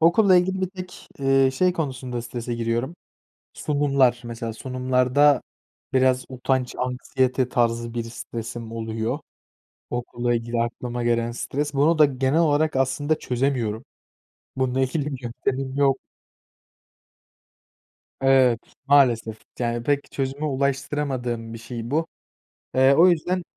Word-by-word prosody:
Okulla 185 +4 +5
ilgili 190 +1 +1
bir 185 -1 -1
tek, 185 -1 -9
eee, 135 -1 +3
şey 180 +7 +2
konusunda 130 -7 -4
strese 120 0 -5
giriyorum: 120 +7 -2 0.6
sunumlar. 140 -4 +2
Mesela 115 -1 -5
sunumlarda 130 +3 +2 0.5
biraz 130 0 +3
utanç, 130 0 -1
anksiyete, 125 0 0
tarzı 115 -1 0
bir 120 -1 -2
stresim 115 0 -7
oluyor. 115 +4 -3 0.7
Okulla 120 0 -1
ilgili 115 0 -1
aklıma 120 +1 -4
gelen 115 0 +1
stres, 145 +4 -3
bunu 155 +4 +3
da 150 - +8
genel 135 +3 +1
olarak 155 -2 +2
aslında 140 +4 +1
çözemiyorum. 125 -3 -1 0.7
Bununla 130 0 0
ilgili 140 +3 0
bir 135 -3 -5
yöntemim 130 +3 -3
yok. 135 -2 +3 2.2
Evet 130 -3 +4 0.3
maalesef. 120 -6 +4 0.2
Yani 120 -1 -1
pek 145 +2 0
çözüme 135 +2 -3
ulaştıramadığım 135 -4 -2
bir - - -7
şey 120 0 -7
bu. 160 +3 +1 0.7
Eee, 130 +1 +5
o 170 +5 +7
yüzden 180 +2 +1
130 Hz, 120 wpm, -24 LUFS, 120-145 Hz, 2.2 s, da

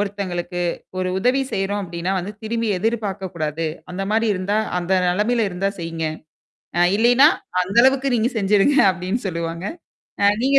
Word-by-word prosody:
ஒருத்தங்களுக்கு 180 -3 -3 0.4
ஒரு 185 - -1
உதவி 250 +6 +2
செய்றோம் 200 +1 -1
அப்பிடின்னா 175 +1 -3
வந்து 190 +4 -5
திரும்பி 230 +1 -2
எதிர்பார்க்கக்கூடாது. 190 -8 -2 0.3
அந்தமாரி 210 +5 0
இருந்தா, 195 +3 -1 0.2
அந்த 180 +2 -2 0.2
நிலைமையில 215 +5 +1
இருந்தா 195 +2 -1
செய்யிங்க. 165 -1 -4 0.7
அ - - +3 0.2
இல்லயின்னா, 245 +6 +6 0.3
அந்த 190 +4 -5
அளவுக்கு 265 -1 +3
நீங்க 230 +4 +1
செஞ்சுருங்க 205 +7 +3
அப்பிடின்னு 185 +5 -3
சொல்லுவாங்க. 170 0 -4 0.6
அ - - +7 0.2
நீங்க 275 +1 +5
195 Hz, 135 wpm, -21 LUFS, 180-225 Hz, 0.7 s, அ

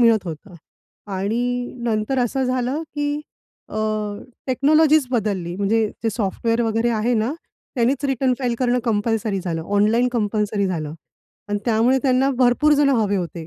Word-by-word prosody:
मिळत 230 -4 +4
होतं 175 +4 -8 0.6
आणि 245 +6 -1
नंतर 225 +3 0
असं 255 +2 0
झालं 255 +4 -1
की 290 0 -1 0.5
अ, - - -10 0.7
टेक्नॉलॉजीच 300 +3 +4
बदलली. 200 -7 -1
म्हणजे 215 +3 +2 0.2
जे 225 - +1
सॉफ्टवेअर 230 +2 -1
वगैरे 225 +1 +1
आहे 225 +3 +1
ना, 225 +4 0 0.4
त्यांनीच 255 +3 +1
रिटर्न 265 -1 +1
फाईल 245 -3 -1
करणं 250 -1 +2
कंपल्सरी 215 -2 0
झालं. 165 -3 -3
ऑनलाईन 225 +5 +3
कंपल्सरी 210 -3 0
झालं 155 -5 -3 0.6
आणि 205 0 0
त्यामुळे 235 +3 +3
त्यांना 265 0 +3
भरपूर 255 +5 +4
जणं 285 -1 +3
हवे 205 -2 +1
होते. 170 -2 -4
230 Hz, 145 wpm, -21 LUFS, 205-255 Hz, 0.7 s, मिळत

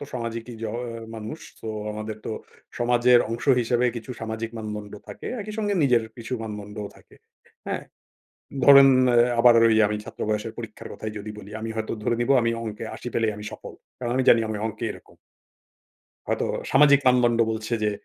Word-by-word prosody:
তো 145 - -5
সামাজিক 115 -1 -4
ই - - -8
জ - - -2
অ - - -4 0.4
মানুষ। 110 +8 -7 0.2
সো - - -9 0.3
আমাদের 110 0 -5
তো - - -4 0.5
সমাজের 120 +1 +4
অংশ 115 +1 -4 0.2
হিসেবে 120 +1 +1
কিছু 115 +2 -7
সামাজিক 110 0 -4
মানদণ্ড 105 -1 -6 0.2
থাকে। - - -8
একই 215 +1 -6
সঙ্গে 205 -2 0
নিজের 125 -5 +4
কিছু 115 0 -8
মানদণ্ডও 105 -1 -6
থাকে। - - -20 0.5
হ্যাঁ? - - -3 0.8
ধরেন 140 0 +9 0.2
অ্যাঁ 120 0 +4
আবার 120 0 +7
ওই 110 - +4
আমি 105 - -2
ছাত্র - - -10
বয়সের 110 +1 -2
পরীক্ষার 115 -3 -8
কথাই 110 - -6
যদি 105 +1 -6
বলি, 100 -1 -10
আমি 115 - -4
হয়তো 110 0 -3
ধরে 120 - +1
নিবো 135 +3 +3
আমি 115 0 +1
অঙ্কে 110 -1 -6
৮০ - - -8
পেলেই 110 -2 +1
আমি 105 0 -9
সফল। - - -9 0.2
কারণ 120 -1 -3
আমি 130 - +2
জানি 115 - +7
আমি 110 - -2
অঙ্কে 110 +1 -5
এরকম - - -15 1.1
হয়তো - - 0 0.3
সামাজিক 140 0 +6
মানদণ্ড 125 -2 +4
বলছে 110 +1 -4
যে, 105 - +2
115 Hz, 185 wpm, -25 LUFS, 110-125 Hz, 1.1 s, ধরেন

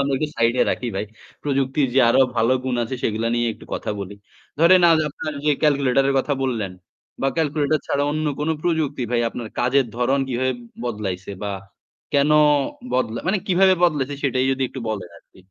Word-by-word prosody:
আমরা 140 0 0
একটু 155 - -1
সাইড 115 0 +3
এ - - +7
রাখি 125 - -2
ভাই। 100 - -1 0.4
প্রযুক্তির 135 0 0
যে 135 - +5
আরো 120 - +4 0.2
ভালো 115 +2 +3
গুণ 130 - -1
আছে 115 - -5
সেগুলা 110 +1 0
নিয়ে 120 0 +1
একটু - - -15
কথা - - -4
বলি। 100 +1 -6 0.4
ধরেন 175 +3 +6
আজ 165 - +5
আপনার 155 +2 -6
যে 150 - +3
ক্যালকুলেটর 135 -3 +3
এর 140 - +1
কথা 145 - 0
বললেন 115 -8 -2 0.5
বা 135 - +3
ক্যালকুলেটর 150 -1 +1
ছাড়া 140 - 0
অন্য 155 +1 -1
কোনো 155 +2 +1
প্রযুক্তি 155 -6 0
ভাই 120 -1 +2
আপনার 115 -1 -7
কাজের 130 +2 +2
ধরন 125 +3 +1
কীভাবে 130 +1 0 0.3
বদলাইছে 100 -5 -4
বা 105 - -2 0.6
কেনো 145 +2 +3 0.6
বদলা 120 -3 0
মানে 195 +2 +2
কিভাবে 190 0 +4
বদলাইছে 145 -5 +1
সেটাই 130 -1 +1
যদি 135 0 -2
একটু 130 - -8
বলেন 100 -5 -4
আরকি। - - -22
135 Hz, 185 wpm, -22 LUFS, 120-150 Hz, 0.6 s, এ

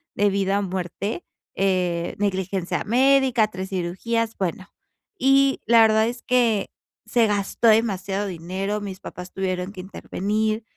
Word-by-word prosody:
de 205 0 +3
vida 195 0 +1
o - - -2
muerte, 190 - -4 0.3
eh, 180 -3 0
negligencia 190 -2 -1
médica, 255 -1 +3
3 190 -1 -6
cirugías, 210 +5 -2
bueno. 185 0 -3 0.5
Y 270 +1 +3
la 230 -1 +6
verdad 220 0 +4
es 240 0 -5
que 235 -5 +2 0.4
se 235 -2 +3
gastó 205 +2 0
demasiado 205 -2 +1
dinero, 190 +4 -3
mis 190 -2 -6
papás 180 -2 -9
tuvieron 185 -1 -3
que 185 - -7
intervenir 215 +3 -2
200 Hz, 135 wpm, -23 LUFS, 185-225 Hz, 0.5 s, la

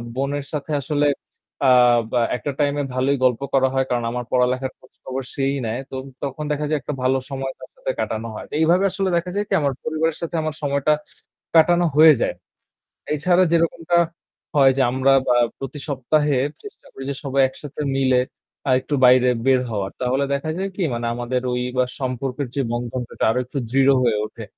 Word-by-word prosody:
বোনের 140 +1 -2
সাথে 150 +1 -4
আসলে 145 +2 0 0.6
আ - - +6 0.4
বা 125 - +2 0.2
একটা 145 - -3
টাইম 145 -1 +2
এ - - -2
ভালোই 135 +2 +1
গল্প 125 0 +2
করা 130 -1 +4
হয় 130 0 +1
কারণ 120 -1 0
আমার 125 0 -4
পড়ালেখার 125 +1 +1
খোঁজখবর 130 +1 -7
সেই 135 0 0
নেয়। 115 +3 -2
তো - - -7 0.3
তখন 140 +2 -4
দেখা 150 0 -1
যায় 155 -1 +1
একটা 150 - -4
ভালো 130 +1 +3
সময় 135 -1 -3
তার - - -11
সাথে - - -3
কাটানো 110 +1 -2
হয়। - - -7
তো - - -14
এইভাবে 175 +4 +4
আসলে 195 -1 -1
দেখা 170 +1 -2
যায় 205 0 0
কি - - -1
আমার 140 -2 +1
পরিবারের 155 0 -1
সাথে 170 0 -4
আমার 155 -1 -3
সময়টা 140 +1 +2 0.6
কাটানো 175 +2 +5
হয়ে 155 0 +9
যায়। - - +1 0.8
এছাড়া 175 +5 +3
যেরকমটা 170 0 +1 0.6
হয় 135 -2 +6
যে - - +3
আমরা 130 +1 +2 0.2
আ - - +4 0.2
প্রতি 135 +2 -6
সপ্তাহে 145 +1 +1 0.3
চেষ্টা 415 - -12
করি 135 - -8
যে - - -4
সবাই 135 -1 +1
একসাথে 145 +2 -8
মিলে 130 -2 +3 0.5
আরেকটু 130 +3 +1
বাইরে 125 0 +6 0.2
বের 130 -1 +4
হওয়ার। 100 -3 -2
তাহলে 130 +2 +1
দেখা 140 +3 -2
যায় 195 +1 -2
কি 190 - -1
মানে 120 0 -3
আমাদের 120 +1 -2
ওই 125 - -1 0.2
বা 125 - +4
সম্পর্কের 130 +1 -3
যে 140 - +1
বন্ধনটা 120 0 -3
আরো 120 +3 +1
একটু 130 - -7
দৃঢ় 135 +2 +4
হয়ে 115 -3 +2
উঠে। 110 - -9
135 Hz, 190 wpm, -22 LUFS, 125-150 Hz, 0.8 s, হয়ে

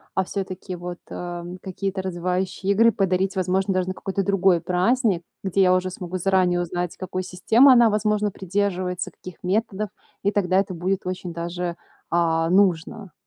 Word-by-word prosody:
а 190 - +2
всё-таки, 190 -1 -5
вот, 175 0 -7
а, 175 -1 -5 0.2
какие-то 190 0 -3
развивающие 185 +1 -1
игры 230 +3 +5
подарить 190 -1 0
возможно 190 +1 +1
даже 185 0 0
на 185 - -2
какой-то 195 +1 -2
другой 190 -3 +3
праздник, 185 +2 +1 0.2
где 195 0 +1
я 185 -1 +5
уже 185 0 0
смогу 180 0 -5
заранее 180 -1 +2
узнать, 175 0 -3
какой 185 0 -4
системы 220 +9 +5
она, 240 -2 +6
возможно, 210 0 +1
придерживается, 185 -1 -2
каких 180 -2 -12
методов, 205 +2 -1 0.3
и 200 - +1
тогда 190 -2 +2
это 195 -2 -2
будет 185 +3 -1
очень 180 -1 -4
даже, 170 +1 -4 0.3
а, 165 -1 +2
нужно. 190 0 +1
185 Hz, 160 wpm, -23 LUFS, 180-195 Hz, 0.3 s, она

